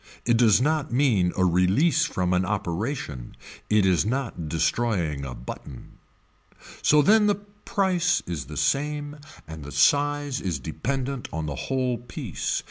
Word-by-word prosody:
It 120 - +3
does 115 -3 +5
not 150 +2 0
mean 120 -9 +2
a 95 - +3
release 100 - +3
from 90 - -1
an 90 +1 +2
operation. 95 - -3 0.3
It 105 -2 +4
is 95 -2 +3
not 110 - -3
destroying 80 -2 0
a 65 -2 -6
button. 65 +1 -10 0.8
So 150 0 +5
then 210 +5 +5
the 205 - +3
price 195 -4 -1
is 80 -8 -4
the - - -9
same 145 +1 -1 0.3
and 80 -1 -8
the 70 - -8
size 145 - +2
is 90 -5 -2
dependent 135 - -4
on 80 -1 -3
the 75 - -3 0.2
whole 130 -3 0
piece. 120 - -4
120 Hz, 145 wpm, -25 LUFS, -, 0.8 s, does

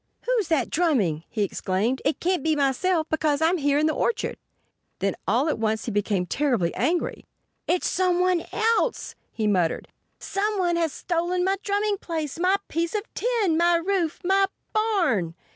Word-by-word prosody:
"Who's 485 -7 0
that 310 -7 0
drumming?" 215 - +1
he 215 -3 -1
exclaimed. 200 +6 -1
"It 290 - 0
can't 365 -2 0
be 315 +2 +1
myself, 315 +4 +1
because 305 -2 +1
I'm 330 +3 +3
here 285 0 +2
in 300 - +2
the 310 - +2
orchard." 465 - -1 0.6
Then 195 0 -1
all 240 - +2
at 310 - -1
once 220 -1 -1
he 235 - -3
became 205 -3 0
terribly 240 - 0
angry. 345 +2 -1 0.4
"It's 360 - +1
somebody 360 -1 +1
else!" 455 +2 0 0.2
he 220 - -3
muttered. 180 -6 +1 0.3
"Somebody 390 -4 0
has 330 -2 +1
stolen 350 +3 -1
my 385 +1 +1
drumming 410 0 0
place—my 335 +3 -1
piece 335 +4 -2
of 415 - 0
tin—my 345 -8 +2
roof—my 380 +2 +1 0.3
barn!" 345 - +1
330 Hz, 150 wpm, -25 LUFS, 255-370 Hz, 0.6 s, I'm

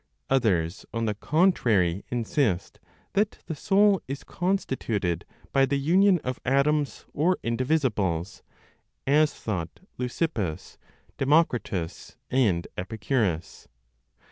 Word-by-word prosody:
Others, 100 -9 +1
on 115 0 -1
the 105 - 0
contrary, 110 - +2
insist 115 - -1 0.3
that 205 +1 +1
the 165 - -4
soul 195 +5 +3
is 135 +1 -5
constituted 125 - -1 0.3
by 135 0 +4
the 140 +2 +1
union 180 +7 +4
of 130 -1 -3
atoms 140 +2 +1
or 175 +5 +2
indivisibles 115 - 0 0.6
(as 150 +2 +4
thought 90 -6 -5 0.2
Leucippus, 120 - -3 0.4
Democritus 130 - 0
and 105 -10 +2
Epicurus. 100 - -2
130 Hz, 95 wpm, -26 LUFS, 100-150 Hz, 0.6 s, by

